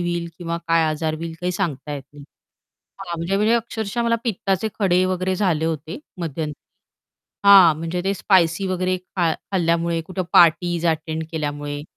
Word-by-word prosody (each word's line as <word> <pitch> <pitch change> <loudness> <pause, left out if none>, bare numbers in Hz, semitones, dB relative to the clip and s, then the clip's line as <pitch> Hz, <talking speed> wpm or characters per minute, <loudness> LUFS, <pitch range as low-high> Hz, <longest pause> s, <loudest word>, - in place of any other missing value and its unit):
होईल 175 -1 -2
किंवा 170 -1 -3
काय 165 0 +4
आजार 155 0 -2
होईल 165 +1 -6
काही 180 0 -1
सांगता 150 -6 -3
येत 140 - -6
नाही. 145 -1 -12 0.7
हां, 170 - -5
म्हणजे 170 +4 -1
म्हणजे 210 +3 +2
अक्षरशः 230 -1 -2
मला 230 0 +2
पित्ताचे 195 -2 -1
खडे 185 -2 +3
वगैरे 185 0 -1
झाले 175 -6 +1
होते 160 - -3 0.2
मध्यंतरी 155 -2 -4 0.9
हां, 190 -5 +9
म्हणजे 165 +2 -3
ते 195 +1 +1
स्पाइसी 185 -1 +2
वगैरे 185 0 0
खा 180 -2 -1
खाल्ल्यामुळे 170 -2 -1
कुठे 185 0 -3
पार्टीज 170 0 +4
अटेंड 160 0 -1
केल्यामुळे. 145 -2 -4
170 Hz, 155 wpm, -22 LUFS, 160-185 Hz, 0.9 s, हां